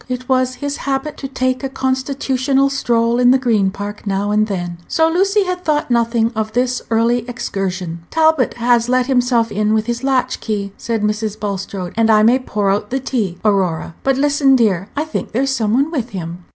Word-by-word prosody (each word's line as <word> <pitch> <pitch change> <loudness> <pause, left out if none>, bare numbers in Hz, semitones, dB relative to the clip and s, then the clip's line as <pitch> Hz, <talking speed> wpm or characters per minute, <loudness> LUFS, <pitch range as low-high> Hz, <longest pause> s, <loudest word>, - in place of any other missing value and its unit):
It 255 0 -4
was 255 -1 +1
his 285 +1 -4
habit 275 +2 -3
to 270 - -5
take 255 0 -1
a 270 - -2
constitutional 265 +1 0
stroll 235 -3 +1
in 245 0 +5
the 260 - +6
Green 225 -7 +1
Park 205 +2 -7
now 200 +1 0
and 215 +1 +2
then, 175 -4 -4
so 320 0 +2
Lucy 390 +5 +2
had 365 -1 -3
thought 300 -5 0
nothing 230 -1 +2
of 220 0 -2
this 250 +1 0
early 230 +2 +2
excursion. 185 -7 -4
"Talbot 315 -4 +2
has 240 0 +2
let 255 0 +2
himself 245 -3 +1
in 210 +1 +1
with 215 0 0
his 240 +1 -3
latchkey," 245 -6 -1
said 225 -2 -3
Mrs. 215 0 -2
Bulstrode, 195 -3 -4
"and 225 -1 +2
I 215 -1 +5
may 240 +4 +5
pour 205 -6 -1
out 205 +1 -1
the 265 - -1
tea, 220 -9 -2
Aurora. 185 -6 +1
But 270 -1 +1
listen, 280 -1 +3
dear; 200 -5 +1
I 295 - 0
think 315 - -5
there's 270 +4 +1
some 225 -5 0
one 280 +5 +1
with 255 -7 -2
him." 175 -3 -7
240 Hz, 195 wpm, -18 LUFS, 210-265 Hz, -, the